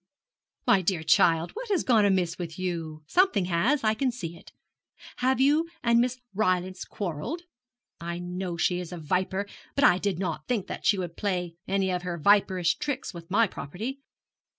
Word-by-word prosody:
'My 195 - +5
dear 175 -2 0
child, 165 +1 +4
what 485 0 -7
has 390 -5 +2
gone 225 -5 +4
amiss 185 -3 +1
with 165 -2 -5
you? 165 -4 -4
Something 230 - +3
has, 215 - +1
I 215 0 +3
can 255 +3 0
see. 170 -8 -7 0.7
Have 260 +1 +1
you 300 +5 +3
and 235 -1 +4
Miss 250 +1 -1
Rylance 185 -2 0
quarrelled? 205 - -4 0.6
I 170 0 -4
know 180 0 -4
she 175 +1 +1
is 180 -1 -6
a 175 - -5
viper; 185 +5 -1 0.3
but 280 - +2
I 180 -10 +6
did 200 -3 -1
not 175 -5 -3
think 225 -6 0 0.2
she 205 - +3
would 175 -3 -4
play 180 -4 -1
any 195 -1 +1
of 180 -1 -1
her 175 -1 -4
viperish 185 - +3
tricks 285 -6 -3
with 170 -1 -10
my 220 +4 +4
property.' 220 - -6
185 Hz, 175 wpm, -27 LUFS, 175-235 Hz, 0.7 s, I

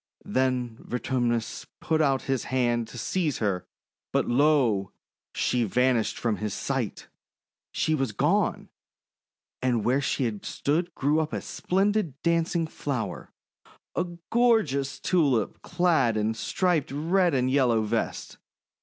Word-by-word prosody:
Then 125 -3 0
Vertumnus 120 -2 -2
put 160 -1 +1
out 135 -3 +2
his 135 -2 -1
hand 120 -3 0
to 120 - -10
seize 155 - -1
her, 100 -4 -1 0.4
but, - - +1
lo! 120 -7 +2 0.4
she 125 -1 +1
vanished 125 +2 +1
from 115 -3 -1
his 105 -2 -3
sight! - - -3 0.6
She 155 - 0
was 135 -6 0
gone! 100 - +1 0.9
and 120 -4 +1
where 130 +3 +2
she 140 - 0
had 110 -4 -3
stood 165 +4 -1
grew 145 +3 +2
up 155 -1 -2
a - - -1
splen 195 +3 0
did 175 -10 -2
dancing 170 0 +1
flower 140 -6 -4 0.3
— - - -66 0.3
a 180 - +1 0.3
gorgeous 220 - +2
Tulip 140 - +1
clad 145 -11 +2
in 105 +1 +1
a - - -2
striped 155 - 0
red 170 +3 +2
and 130 0 +1
yellow 125 -5 +3
vest. 105 - -3
130 Hz, 135 wpm, -27 LUFS, 120-160 Hz, 0.9 s, yellow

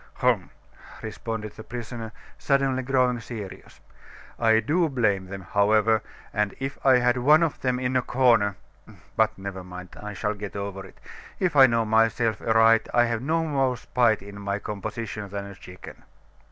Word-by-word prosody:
"Hum!" - - +1 0.5
responded 110 0 -5
the 110 - -10
prisoner, 115 -1 -7 0.3
suddenly 135 -2 +1
growing 125 -2 +1
serious. 110 -4 -9 0.6
"I 110 -1 +4
do 160 +9 +1
blame 105 -8 0
them, 95 +1 -7
however, 110 +1 +3 0.3
and 105 -1 0
if 135 +1 -5
I 130 -2 +6
had 125 0 +2
one 150 +6 +5
of 165 - -2
them 125 -1 0
in 130 0 -1
a 130 - +4
corner 120 -6 +3 0.6
But, 110 0 +2
never 95 -1 -6
mind, 90 0 -9
I 105 0 -6
shall 105 +2 -2
get 105 -1 -8
over 100 -1 -5
it. - - -19 0.4
If 180 -4 0
I 135 -2 +9
know 115 -1 +1
myself 110 0 +2
aright, 115 0 +4
I 120 0 +5
have 115 -1 -2
no 160 +5 0
more 135 -4 0
spite 115 -5 +1
in 100 0 -10
my 100 0 -2
composition 105 0 -5
than 100 0 -5
a 100 - -9
chicken." 90 -1 -12
115 Hz, 165 wpm, -25 LUFS, 100-125 Hz, 0.6 s, I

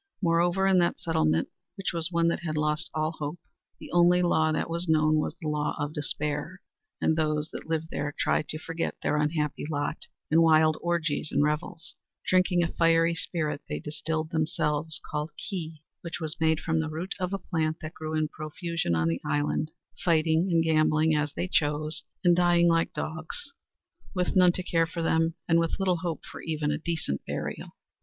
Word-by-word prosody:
Moreover, 175 +1 +2
in 190 -1 +5
that 170 -1 +1
settlement, 80 - +1 0.3
which 195 - -3
was 165 +1 0
one 170 -1 +2
that - - -1
had 155 -3 -3
lost 150 +2 0
all 155 0 0
hope, 150 0 -5 0.4
the - - -10
only 175 +1 +5
law 160 -2 +3
that 155 - -1
was 170 +1 -2
known 155 0 +4
was 155 +1 -1
the 160 - -5
law 150 0 -1
of 145 0 -3
despair, 150 +3 -3 0.4
and 160 - +2
those 155 -1 0
that - - -8
lived 160 0 -1
there 145 0 -2
tried 150 - +1
to 155 - -3
forget 165 +1 -3
their 150 - +1
unhappy 150 -1 0
lot 145 -2 -3 0.2
in 165 +2 +6
wild 155 -1 +5
orgies 165 -3 -1
and 140 +1 +3
revels, 155 +3 -2 0.3
drinking 185 -1 +3
a - - +1
fiery 165 0 +4
spirit 155 -3 -2
they 75 - -2
distilled 155 - -3
themselves 155 -1 -1
called 150 +1 -3
"Ki" 165 -6 -6 0.2
which 170 0 -5
was 160 -2 -5
made 160 0 +3
from 160 -1 0
the 160 0 -1
root 165 +5 -3
of 180 0 -1
a 195 - 0
plant 160 -4 -1
that 155 0 -6
grew 155 0 -4
in 155 0 +1
profusion 155 - -3
on 80 0 +1
the 85 0 -1
island, 145 +1 0 0.3
fighting 165 0 +3
and 165 -1 +4
gambling 155 0 +3
as 150 -1 +1
they 180 - -1
chose, 155 -2 +1 0.2
and 175 -1 +5
dying 175 -1 +4
like 165 -1 +2
dogs 160 - -6 0.6
with 180 +1 0
none 180 -1 +7
to 185 - -2
care 165 -2 +2
for 165 0 -4
them, 165 0 +2
and 165 0 +4
with 165 -1 0
little 185 -2 +1
hope 165 -1 -4
for - - -9
even 155 -2 -1
a 150 - -1
decent 160 - -2
burial. - - -4
160 Hz, 190 wpm, -28 LUFS, 155-170 Hz, 0.6 s, none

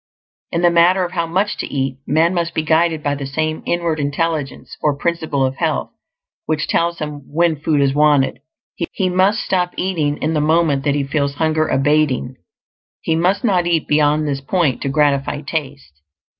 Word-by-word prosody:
In 170 0 -1
the 175 - +5
matter 180 +2 +4
of 175 - -7
how 170 -2 -2
much 190 +5 -1
to - - -3
eat, 135 -1 -2
man 160 +4 +2
must 170 -2 -2
be 160 - 0
guided 160 0 +1
by 145 - 0
the 140 -1 -5
same 155 +3 -2
inward 170 -2 -1
intelligence, 145 0 -3
or 150 -2 +1
Principle 160 -4 -1
of 130 +1 -3
Health, 160 -3 -1 0.6
which 155 0 -1
tells 170 0 0
him 150 -2 -5
when 165 +1 +2
food 150 0 0
is 135 -1 +2
wanted. 145 -3 +3 0.5
He 185 -1 0
must 190 +3 +2
stop 180 -2 -1
eating 160 -6 -1
in 155 +1 -1
the 150 - +1
moment 155 -3 +2
that 145 -1 +2
he 145 - 0
feels 140 0 -1
hunger 155 0 +1
abating; 135 -2 +1 0.6
he 160 - 0
must 185 +4 +1
not 185 -7 +2
eat 165 -3 0
beyond 150 0 +2
this 140 -1 -2
point 140 -4 0
to 135 - -2
gratify 145 0 +1
taste. 135 - -6
155 Hz, 185 wpm, -18 LUFS, 145-170 Hz, 0.6 s, the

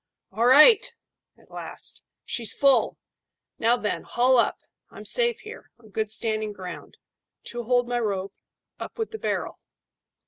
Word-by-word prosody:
"All 230 +2 +1
right!" 395 - +7 0.5
at - - -24
last. - - -4 0.2
"She's 230 -3 0
full. 275 -1 +3 0.6
Now, 235 +2 +3
then, 210 - -3
haul 255 +2 +2
up. 235 - +2 0.3
I'm - - -12
safe 475 -1 0
here, - - -11
on 225 -2 -19
good 215 +1 -2
standing 215 -1 0
ground. 185 -2 -9 0.5
Two 240 -1 -6
hold 245 0 +2
my 245 0 -1
rope. 200 -3 -3 0.5
Up - - -8
with 450 -1 -3
the 440 - -7
barrel." - - -3
240 Hz, 145 wpm, -25 LUFS, 215-270 Hz, 0.6 s, right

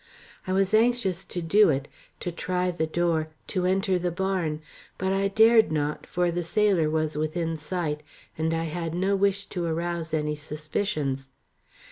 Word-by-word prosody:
I 185 - 0
was 195 +1 +2
anxious 220 -5 +2
to 175 - -4
do 200 +4 +5
it, 140 -1 0 0.3
to 175 - -2
try 180 +2 -1
the 160 -2 -1
door, 165 -1 +1 0.2
to 180 -2 0
enter 190 0 +2
the 175 0 0
barn, 175 -4 -1 0.4
but 190 +1 0
I 195 0 +2
dared 220 +1 +5
not, 150 -1 -2
for 175 0 +1
the 175 +1 -1
sailor 185 -3 +2
was 155 -1 0
within 160 +2 -1
sight, 155 -1 -3 0.3
and 160 +1 0
I 165 0 0
had 165 0 -3
no 190 +3 +1
wish 200 0 +1
to 180 - -2
arouse 170 0 -2
any 150 -1 0
suspicions. 150 -2 -3
175 Hz, 165 wpm, -26 LUFS, 155-190 Hz, 0.4 s, do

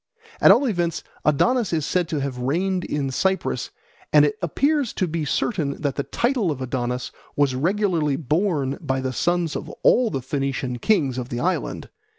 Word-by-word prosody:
At - - +8
all 285 - +6
events 175 -8 -1 0.2
Adonis 225 - +2
is 155 -3 0
said 175 +1 0
to 150 -3 -1
have 135 -2 -3
reigned 180 +8 0
in 140 -2 -2
Cyprus, 190 +8 0 0.4
and - - +7
it 425 - 0
appears 285 -4 +1
to 185 - 0
be 160 -1 -2
certain 145 - -1
that 145 -3 -1
the - - 0
title 235 - 0
of 145 -4 -2
Adonis 125 -1 -3 0.2
was 145 -2 +2
regularly 165 0 +1
borne 150 -1 0
by 130 0 -1
the 130 0 -2
sons 175 +2 0
of - - -5
all 245 -2 +5
the 135 -7 -3
Phoenician 135 -2 -2
kings 140 - +1
of 125 0 -5
the 120 - -3
island. 185 +7 -2
150 Hz, 175 wpm, -23 LUFS, 135-190 Hz, 0.4 s, At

